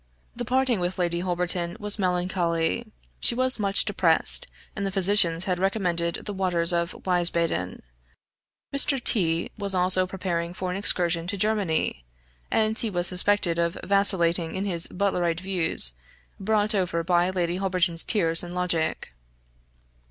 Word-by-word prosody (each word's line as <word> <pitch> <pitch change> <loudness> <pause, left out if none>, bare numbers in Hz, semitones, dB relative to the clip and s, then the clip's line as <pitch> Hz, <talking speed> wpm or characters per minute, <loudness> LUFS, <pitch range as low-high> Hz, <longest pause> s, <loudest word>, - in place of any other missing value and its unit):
The 245 0 -5
parting 255 -2 0
with 180 +1 -3
Lady 175 -1 -1
Holberton 175 -1 0
was 210 0 -2
melancholy; 180 +2 -1 0.3
she 235 - +1
was 255 -1 0
much 200 -1 +1
depressed, - - +1 0.3
and 200 - -4
the 195 - -1
physicians 190 -3 +3
had 180 -2 -2
recommended 180 -4 -2
the 205 - -4
waters 180 -3 +2
of 170 +1 -2
Wiesbaden. 170 - 0 0.9
Mr. 280 -2 +2
T 170 -5 +2
was 200 -2 +2
also 185 0 +3
preparing 175 -2 -4
for 185 -1 -4
an - - -4
excursion 175 -4 0
to 200 +2 -3
Germany; 190 - -1 0.5
and 220 0 +1
he 230 - -1
was 175 -3 -2
suspected 180 -2 +2
of 170 0 -1
vacillating 175 -4 +3
in 190 +1 -3
his 175 -4 -1
Butlerite 180 -3 -1
views, 175 - +1 0.5
brought 210 +1 0
over 180 -4 -1
by 175 +1 +1
Lady 180 -1 -2
Holberton's 180 -3 +2
tears 165 -7 +2
and 175 0 -8
logic. 165 - -2
180 Hz, 145 wpm, -24 LUFS, 170-200 Hz, 0.9 s, physicians